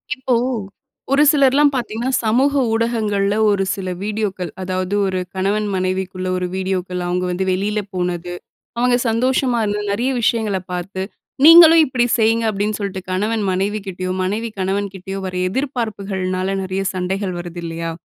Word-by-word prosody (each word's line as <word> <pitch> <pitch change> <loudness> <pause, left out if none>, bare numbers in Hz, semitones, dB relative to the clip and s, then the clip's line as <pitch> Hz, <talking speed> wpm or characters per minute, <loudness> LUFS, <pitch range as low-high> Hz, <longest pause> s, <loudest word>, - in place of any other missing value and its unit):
இப்போ 260 -1 -1 0.8
ஒரு 285 +2 +5
சிலர்லாம் 285 0 +4
பாத்தீங்கன்னா, 240 0 -2
சமூக 255 +6 +2 0.2
ஊடகங்கள்ல 215 -3 0
ஒரு 200 -1 +2
சில 190 -2 -5
வீடியோக்கள் 205 -4 -3
அதாவது, 185 +1 -2
ஒரு 185 -1 -1 0.2
கணவன் 205 +3 0
மனைவிக்குள்ள 185 0 -2
ஒரு 180 0 -2
வீடியோக்கள் 185 -1 -2
அவுங்க 180 +1 -1
வந்து 190 +2 -1
வெளியில 205 +3 0
போனது, 180 -1 -3 0.4
அவுங்க 245 0 +3
சந்தோஷமா 250 +1 +1
இருந்தது, 210 0 -2
நெறைய 245 +6 0
விஷயங்கள 220 -3 +1
பாத்து 185 +2 -4 0.4
"நீங்களும் 330 0 +9
இப்டி 250 -2 +1
செய்ங்க" 225 0 +2
அப்டின்னு 210 +1 -2
சொல்ட்டு 195 -2 -4
கணவன் 210 +4 0
மனைவிகிட்டயோ, 190 -1 -2
மனைவி 220 +5 -2
கணவன் 195 +1 -1
கிட்டயோ 190 +1 -6
வர்ற 185 -1 -3
எதிர்பார்ப்புகள்னால, 195 -7 -2
நெறைய 190 +1 -2
சண்டைகள் 185 0 -2
வருதில்லையா? 170 -1 -5
200 Hz, 135 wpm, -19 LUFS, 185-230 Hz, 0.8 s, நீங்களும்